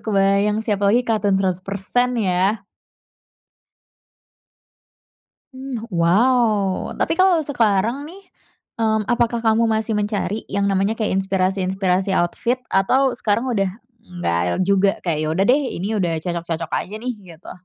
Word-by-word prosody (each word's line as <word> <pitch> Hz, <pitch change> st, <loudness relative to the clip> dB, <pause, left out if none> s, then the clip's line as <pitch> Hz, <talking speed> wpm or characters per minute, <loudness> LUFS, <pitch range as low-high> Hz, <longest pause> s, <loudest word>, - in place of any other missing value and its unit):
kebayang 200 Hz, 0 st, +1 dB
sih 215 Hz, -, 0 dB
apa 200 Hz, 0 st, +1 dB
lagi, 230 Hz, +5 st, +4 dB
cotton 215 Hz, -4 st, +1 dB
100% 195 Hz, +6 st, -1 dB
ya. 195 Hz, +1 st, 0 dB, 2.9 s
Mmm, 260 Hz, -3 st, -6 dB
wow. 205 Hz, +2 st, +2 dB
Tapi -, -, +1 dB
kalo 370 Hz, 0 st, +4 dB
sekarang 230 Hz, -1 st, +1 dB
nih, 380 Hz, +4 st, -12 dB, 0.6 s
mmm, 220 Hz, -1 st, +1 dB
apakah 235 Hz, 0 st, +1 dB
kamu 225 Hz, 0 st, +2 dB
masih 220 Hz, 0 st, 0 dB
mencari 210 Hz, 0 st, -2 dB
yang 200 Hz, 0 st, 0 dB
namanya 195 Hz, +3 st, 0 dB
kayak 215 Hz, -4 st, 0 dB
inspirasi-inspirasi 190 Hz, 0 st, 0 dB
outfit 235 Hz, +8 st, 0 dB
atau 255 Hz, +8 st, +2 dB
sekarang 230 Hz, +1 st, 0 dB
udah 195 Hz, -3 st, +1 dB, 0.4 s
nggak 85 Hz, -, -2 dB, 0.2 s
juga 195 Hz, 0 st, +3 dB
kayak, 165 Hz, -4 st, -1 dB
ya 155 Hz, -, -1 dB
udah 195 Hz, -, +2 dB
deh, 275 Hz, +4 st, +4 dB, 0.2 s
ini 185 Hz, -, -3 dB
udah 170 Hz, -3 st, 0 dB
cocok-cocok 170 Hz, -1 st, -4 dB
aja 205 Hz, -, -3 dB
nih, 250 Hz, +2 st, -3 dB, 0.2 s
gitu? 160 Hz, -, -13 dB
200 Hz, 130 wpm, -20 LUFS, 190-230 Hz, 2.9 s, lagi